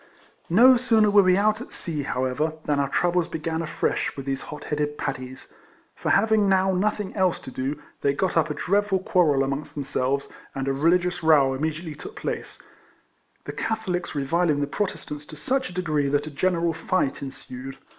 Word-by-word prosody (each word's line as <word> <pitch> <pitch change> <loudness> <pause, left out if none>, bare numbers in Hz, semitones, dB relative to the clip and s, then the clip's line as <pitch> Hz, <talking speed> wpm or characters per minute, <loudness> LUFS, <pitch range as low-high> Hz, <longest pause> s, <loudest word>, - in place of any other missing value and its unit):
Xo 245 +8 +7
sooner 220 -4 +3
were 205 0 +7
we 185 -1 +4
out 215 +2 +2
at - - -9
sea, 155 -4 -3
however, 130 +3 -1
than 145 -1 +1
our 140 -1 0
troubles 175 +2 +1
began 160 +1 -3
afresh 155 -2 -1
with 135 - -6
these 135 -1 -2
hot 150 - -7
headed 150 0 -2
Paddies; 130 -1 -5 0.4
for, - - -3
having 215 -1 +4
now 190 0 +3
nothing 205 +1 -1
else 185 -3 +2
to 130 - -9
do, 135 +4 -3 0.2
they 140 - +3
got 180 +7 -1
up 165 -1 +3
a 150 - -3
dreadful 200 +1 +1
quarrel 165 -7 +2
amongst 140 +2 -4
themselves, 140 -1 -1 0.3
and 135 0 -3
a 135 - +1
religious 175 +5 +2
row 150 -5 +5
immediately 155 +3 -3
took 405 - -10
place, - - -4 0.9
the - - -5
Catholics 195 -7 -2
re 140 -1 -1
viling 165 0 +2
the 145 - +1
Protestants 150 -3 -4
to 155 - -9
such 260 - -1
a - - -10
degree 155 -6 0
that 145 +1 +1
a 155 - -7
general 170 +2 +1
fight 165 -2 -1
ensued. 135 -1 -7
160 Hz, 185 wpm, -25 LUFS, 140-185 Hz, 0.9 s, Xo